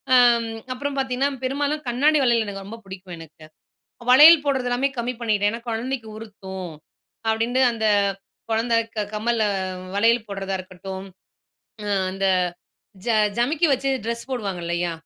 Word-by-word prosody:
ஆம் 240 Hz, -2 st, +5 dB, 0.3 s
அப்பறம் 285 Hz, +2 st, -4 dB
பார்த்தீங்கன்னா, 265 Hz, +1 st, 0 dB
பெரும்பாலும் 285 Hz, +3 st, -1 dB
கண்ணாடி 290 Hz, +6 st, +3 dB
வளையல் 235 Hz, -2 st, +3 dB
எனக்கு 195 Hz, -1 st, -6 dB
ரொம்ப 220 Hz, +3 st, -8 dB
புடிக்கும் 190 Hz, -2 st, -9 dB
எனக்கு. 160 Hz, -1 st, -13 dB, 0.7 s
வளையல் 300 Hz, +4 st, +9 dB
போட்றது 265 Hz, -3 st, 0 dB
எல்லாமே 245 Hz, +3 st, +1 dB
கம்மி 245 Hz, +2 st, -2 dB
பண்ணிட்டேன். 210 Hz, -3 st, +1 dB
ஏன்னா, 230 Hz, -, -5 dB
"கொழந்தைக்கு 230 Hz, +1 st, -3 dB
உறுத்தும்." 190 Hz, -5 st, -8 dB, 0.6 s
அப்படீன்ட்டு 230 Hz, +4 st, +1 dB
அந்த 220 Hz, -1 st, -1 dB, 0.6 s
கொழந்த 230 Hz, +1 st, +1 dB, 0.2 s
க 210 Hz, -, 0 dB
கம்மல, 225 Hz, +1 st, 0 dB, 0.5 s
வளையல் 230 Hz, +2 st, +3 dB
போடுறதா 195 Hz, -1 st, -3 dB
இருக்கட்டும், 190 Hz, +1 st, -8 dB, 0.8 s
ம் 200 Hz, -1 st, +1 dB
அந்த 195 Hz, +1 st, -1 dB, 0.8 s
ஜ -, -, -1 dB, 0.3 s
ஜமிக்கி 295 Hz, +8 st, +2 dB
வச்சு 270 Hz, +1 st, 0 dB, 0.2 s
ட்ரெஸ் 235 Hz, +2 st, -4 dB
போடுவாங்க 200 Hz, -8 st, -3 dB
இல்லையா? 170 Hz, 0 st, -1 dB
230 Hz, 135 wpm, -23 LUFS, 195-255 Hz, 0.8 s, வளையல்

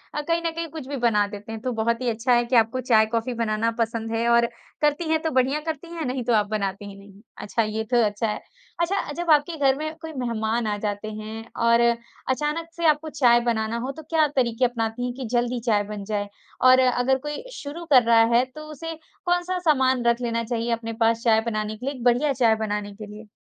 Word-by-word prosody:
अ, 300 Hz, -, -1 dB
कहीं 335 Hz, +2 st, 0 dB
न 330 Hz, -, +1 dB
कहीं 330 Hz, 0 st, -4 dB
कुछ 300 Hz, -4 st, -8 dB
भी 285 Hz, -, -4 dB
बना 220 Hz, -4 st, +2 dB
देते 205 Hz, +2 st, -9 dB
हैं। 220 Hz, -1 st, -6 dB
तो 255 Hz, 0 st, -2 dB
बहुत 230 Hz, +2 st, 0 dB
ही 245 Hz, -, 0 dB
अच्छा 235 Hz, +3 st, +1 dB
है 240 Hz, 0 st, +3 dB
कि 250 Hz, -, 0 dB
आपको 230 Hz, +2 st, +3 dB
चाय-कॉफ़ी 230 Hz, 0 st, +2 dB
बनाना 225 Hz, -1 st, 0 dB
पसंद 225 Hz, 0 st, -1 dB
है, 230 Hz, +1 st, 0 dB
और 235 Hz, 0 st, +5 dB, 0.4 s
करती 300 Hz, +2 st, +1 dB
हैं 320 Hz, 0 st, +2 dB
तो 320 Hz, -, -1 dB
बढ़िया 260 Hz, +3 st, +2 dB
करती 320 Hz, +1 st, -4 dB
हैं, 325 Hz, -4 st, -4 dB
नहीं 255 Hz, 0 st, -2 dB
तो 240 Hz, 0 st, +1 dB
आप 210 Hz, -1 st, +3 dB
बनाती 200 Hz, -1 st, -2 dB
ही 195 Hz, -, -10 dB
नहीं। 200 Hz, 0 st, -16 dB, 0.2 s
अच्छा, 225 Hz, +2 st, -1 dB
ये 215 Hz, +1 st, -2 dB
तो 240 Hz, -1 st, +4 dB
अच्छा 210 Hz, +2 st, -1 dB
है। 210 Hz, -, -2 dB, 0.4 s
अच्छा 380 Hz, +4 st, +1 dB
अ, -, -, -4 dB
जब 345 Hz, +1 st, -4 dB
आपके 305 Hz, +2 st, +3 dB
घर 270 Hz, -2 st, +3 dB
में 310 Hz, +1 st, -4 dB
कोई 320 Hz, -1 st, -7 dB
मेहमान 230 Hz, -3 st, -1 dB
आ 205 Hz, 0 st, -1 dB
जाते 205 Hz, +1 st, -4 dB
हैं 220 Hz, +1 st, -7 dB, 0.2 s
और 235 Hz, 0 st, +5 dB, 0.5 s
अचानक 300 Hz, +5 st, -1 dB
से 340 Hz, -1 st, -2 dB
आपको 305 Hz, +1 st, +2 dB
चाय 240 Hz, -5 st, +4 dB
बनाना 220 Hz, 0 st, -1 dB
हो, 255 Hz, +3 st, -3 dB
तो 315 Hz, +3 st, -11 dB
क्या 315 Hz, 0 st, +2 dB
तरीके 250 Hz, -1 st, +2 dB
अपनाती 235 Hz, 0 st, -2 dB
हैं 245 Hz, -, -3 dB
कि 260 Hz, -, -4 dB
जल्दी 240 Hz, 0 st, +1 dB
चाय 210 Hz, -3 st, +2 dB
बन 205 Hz, -1 st, -6 dB
जाए? 205 Hz, -1 st, -2 dB, 0.3 s
और 255 Hz, 0 st, +7 dB
अगर 255 Hz, +1 st, +3 dB
कोई 295 Hz, +9 st, -4 dB
शुरू 310 Hz, +4 st, -7 dB
कर 250 Hz, -2 st, +8 dB
रहा 230 Hz, 0 st, +5 dB
है, 245 Hz, -, +5 dB
तो 260 Hz, +4 st, -12 dB
उसे 325 Hz, +3 st, -6 dB, 0.3 s
कौन-सा 355 Hz, +1 st, 0 dB
सामान 260 Hz, -7 st, +2 dB
रख 235 Hz, +1 st, +2 dB
लेना 230 Hz, -1 st, -1 dB
चाहिए 235 Hz, 0 st, -2 dB
अपने 230 Hz, 0 st, -2 dB
पास 230 Hz, 0 st, +2 dB
चाय 220 Hz, -2 st, +4 dB
बनाने 215 Hz, -1 st, -2 dB
के 250 Hz, -, -8 dB
लिए 280 Hz, 0 st, -2 dB
एक 245 Hz, -, -8 dB
बढ़िया 255 Hz, +4 st, +3 dB
चाय 230 Hz, -4 st, +3 dB
बनाने 210 Hz, -2 st, -3 dB
के 215 Hz, 0 st, -8 dB
लिए? 215 Hz, 0 st, -12 dB
240 Hz, 235 wpm, -24 LUFS, 220-285 Hz, 0.5 s, कर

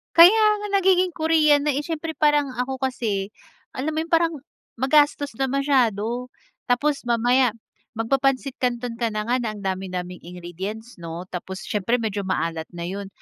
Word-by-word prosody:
Kaya 370 Hz, +7 st, +8 dB, 0.2 s
nga! -, -, -3 dB
Nagiging 370 Hz, -1 st, +3 dB
Korean 315 Hz, -3 st, +3 dB
na 290 Hz, -, +2 dB
eh. 290 Hz, -, -1 dB
Siyempre 320 Hz, 0 st, -4 dB
parang 295 Hz, -3 st, +2 dB
ako 260 Hz, +2 st, -3 dB
kasi, 225 Hz, -7 st, -1 dB, 0.5 s
alam 280 Hz, +5 st, -2 dB
mo 310 Hz, -, -2 dB
yung 325 Hz, -, -3 dB
parang, 330 Hz, 0 st, +3 dB, 0.5 s
magastos 290 Hz, +1 st, +3 dB
na 270 Hz, -, +1 dB
masyado. 250 Hz, -4 st, +1 dB, 0.4 s
Tapos 280 Hz, +4 st, +1 dB
mamaya 245 Hz, +1 st, +3 dB, 0.4 s
magpa-pansit 270 Hz, +3 st, 0 dB
canton 240 Hz, -2 st, -2 dB
ka 235 Hz, -, +1 dB
na 215 Hz, -1 st, -2 dB
nga, 250 Hz, +2 st, +2 dB
na 220 Hz, -3 st, -3 dB
ang 205 Hz, -, -10 dB
dami-daming 185 Hz, -1 st, -4 dB
ingredients, 180 Hz, +6 st, -8 dB
'no? 170 Hz, +1 st, -6 dB
Tapos, 190 Hz, +1 st, -6 dB
siyempre 210 Hz, +3 st, 0 dB
medyo 210 Hz, -5 st, -2 dB
maalat 165 Hz, -3 st, -2 dB
na 170 Hz, -, -5 dB
yun. 195 Hz, +3 st, -5 dB
245 Hz, 160 wpm, -23 LUFS, 200-290 Hz, 0.5 s, Kaya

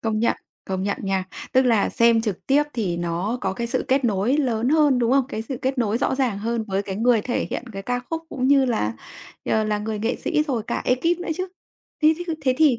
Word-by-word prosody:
công 220 Hz, -1 st, -1 dB
nhận, 235 Hz, -, +2 dB, 0.3 s
công 190 Hz, -1 st, -3 dB
nhận 200 Hz, +1 st, -1 dB
nha. 195 Hz, -2 st, 0 dB, 0.3 s
Tức 260 Hz, -1 st, +5 dB
là 230 Hz, -5 st, +3 dB
xem 230 Hz, -1 st, +4 dB
trực 210 Hz, -5 st, -4 dB
tiếp 280 Hz, +2 st, +4 dB
thì 195 Hz, -8 st, -1 dB
nó 175 Hz, +7 st, -2 dB
có 190 Hz, -1 st, -1 dB
cái 235 Hz, +5 st, -3 dB
sự 235 Hz, -, -1 dB
kết 265 Hz, 0 st, +2 dB
nối 220 Hz, +4 st, +2 dB
lớn 245 Hz, -5 st, +1 dB
hơn, 295 Hz, -3 st, +4 dB
đúng 240 Hz, 0 st, +2 dB
không? 270 Hz, -1 st, +4 dB
Cái 220 Hz, -5 st, -4 dB
sự 255 Hz, +3 st, -5 dB
kết 260 Hz, 0 st, -1 dB
nối 225 Hz, -1 st, +1 dB
rõ 265 Hz, -, +1 dB
ràng 255 Hz, -7 st, 0 dB
hơn 230 Hz, +2 st, -2 dB
với 195 Hz, 0 st, 0 dB
cái 195 Hz, -1 st, -5 dB
người 230 Hz, 0 st, +3 dB
thể 250 Hz, -, -1 dB
hiện -, -, -3 dB
cái 195 Hz, -1 st, -6 dB
ca 245 Hz, +4 st, -1 dB
khúc 325 Hz, 0 st, -2 dB
cũng 260 Hz, -4 st, -1 dB
như 275 Hz, -1 st, +5 dB
là, 220 Hz, -, 0 dB, 0.5 s
ờ, 220 Hz, 0 st, +1 dB
là 210 Hz, -1 st, 0 dB
người 215 Hz, 0 st, -3 dB
nghệ 225 Hz, +4 st, -1 dB
sĩ 300 Hz, -, 0 dB
rồi 260 Hz, -7 st, -2 dB
cả -, -, -2 dB
ê 250 Hz, -, +3 dB
kíp 335 Hz, +7 st, 0 dB
nữa 355 Hz, -, -6 dB
chứ. 370 Hz, +1 st, -3 dB, 0.5 s
Thế 310 Hz, +1 st, +6 dB
thế 350 Hz, -, -4 dB
cứ 330 Hz, -, -1 dB
thế 260 Hz, -2 st, +2 dB
thì 295 Hz, -7 st, +5 dB
235 Hz, 260 wpm, -23 LUFS, 210-270 Hz, 0.5 s, Thế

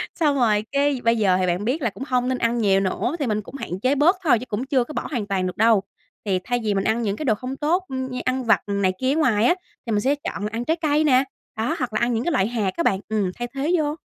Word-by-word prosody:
Xong 300 Hz, -4 st, +2 dB
rồi 215 Hz, -5 st, +2 dB
cái 280 Hz, -2 st, +1 dB
bây 230 Hz, 0 st, +3 dB
giờ 190 Hz, -4 st, +3 dB
thì 185 Hz, -, +1 dB
bạn 180 Hz, +4 st, -1 dB
biết 280 Hz, +6 st, 0 dB
là 240 Hz, -, +1 dB
cũng 255 Hz, -, -8 dB
hông 250 Hz, -1 st, +1 dB
nên 255 Hz, -, 0 dB
ăn 235 Hz, 0 st, 0 dB
nhiều 200 Hz, -4 st, +3 dB
nữa, 195 Hz, -, -1 dB
thì 280 Hz, -, -1 dB
mình 215 Hz, -1 st, 0 dB
cũng 240 Hz, -, -12 dB
hạn 185 Hz, -9 st, -5 dB
chế 255 Hz, +6 st, +2 dB
bớt 315 Hz, +7 st, +4 dB
thôi 260 Hz, -9 st, +4 dB
chứ 250 Hz, -, -7 dB
cũng 240 Hz, +2 st, -3 dB
chưa 265 Hz, -2 st, +2 dB
có 300 Hz, -, -9 dB
bỏ -, -, -3 dB
hoàn 230 Hz, -7 st, -2 dB
toàn 190 Hz, -2 st, 0 dB
được 180 Hz, -, -6 dB
đâu. 220 Hz, -2 st, +4 dB, 0.4 s
Thì 190 Hz, -3 st, +1 dB
thay 245 Hz, 0 st, -1 dB
vì 210 Hz, -2 st, +1 dB
mình 195 Hz, -1 st, 0 dB
ăn 220 Hz, +3 st, +1 dB
những 205 Hz, -3 st, -1 dB
cái 305 Hz, -, -5 dB
đồ 220 Hz, -5 st, +3 dB
không 255 Hz, +5 st, -6 dB
tốt, 330 Hz, +6 st, +1 dB
ừm, 260 Hz, -1 st, -4 dB
như 250 Hz, -, -4 dB
ăn 255 Hz, 0 st, 0 dB
vặt 225 Hz, -, +3 dB
này 200 Hz, -2 st, +1 dB
kia 260 Hz, +1 st, +1 dB
ở -, -, -1 dB
ngoài 235 Hz, -9 st, +3 dB
á, 350 Hz, -, +4 dB, 0.3 s
thì 230 Hz, -, -3 dB
mình 205 Hz, -1 st, +1 dB
sẽ 275 Hz, +6 st, +2 dB
chọn 245 Hz, -8 st, -5 dB
là 210 Hz, -, -1 dB
ăn 235 Hz, +2 st, -3 dB
trái 320 Hz, -, +2 dB
cây 305 Hz, 0 st, +2 dB
nè. 260 Hz, -3 st, +4 dB, 0.3 s
Đó, 235 Hz, +9 st, 0 dB
hoặc 245 Hz, -5 st, -2 dB
là 215 Hz, -, +1 dB
ăn 240 Hz, +1 st, +1 dB
những 230 Hz, +1 st, 0 dB
cái 345 Hz, -, 0 dB
loại 190 Hz, -, +2 dB
hạt 220 Hz, -5 st, -1 dB
á 335 Hz, -, +1 dB
bạn, 190 Hz, -9 st, +2 dB
ừm, 205 Hz, -4 st, 0 dB
thay 240 Hz, -, -2 dB
thế 290 Hz, +5 st, 0 dB
vô. 300 Hz, -1 st, 0 dB
240 Hz, 310 wpm, -23 LUFS, 210-275 Hz, 0.4 s, bớt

